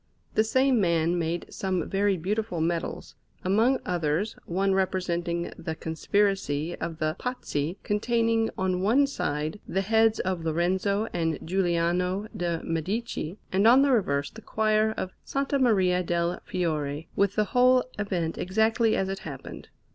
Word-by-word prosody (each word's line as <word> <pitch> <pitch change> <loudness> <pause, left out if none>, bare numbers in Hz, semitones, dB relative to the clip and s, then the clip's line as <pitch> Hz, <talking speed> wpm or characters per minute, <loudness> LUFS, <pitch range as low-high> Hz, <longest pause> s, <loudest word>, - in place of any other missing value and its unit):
The 215 - +4
same 260 +1 +3
man 170 -1 +2
made 170 +1 -2
some 185 -3 -1
very 200 0 +1
beautiful 200 +1 -2
medals; 165 +1 -2 0.3
among 225 +8 +3
others, 175 +3 -1
one 195 +3 +1
representing 175 -2 -1
the 160 - -4
conspiracy 165 -2 0
of 165 -1 -4
the 155 0 -1
Pazzi, 180 - -3
containing 225 +1 +1
on 185 -1 0
one 240 +9 +4
side 155 - -3
the 190 - 0
heads 220 +2 +3
of 185 -3 -2
Lorenzo 185 +6 0
and 165 -2 0
Giuliano 180 +2 0
de' 175 -4 -2
Medici, 180 +2 -3
and 195 +3 +3
on 255 +4 +7
the 280 - +3
reverse 145 - +1
the 225 - -11
choir 215 0 +1
of 185 - -3
S. - - -7 0.2
Maria 190 -7 +3
del 170 0 -1
Fiore, 155 -4 -2
with 200 0 +2
the 215 - +3
whole 250 0 +5 0.2
event 180 -5 -2
exactly 220 +4 +2
as 190 - 0
it 195 0 -3
happened. - - -9
185 Hz, 145 wpm, -27 LUFS, 170-215 Hz, 0.3 s, on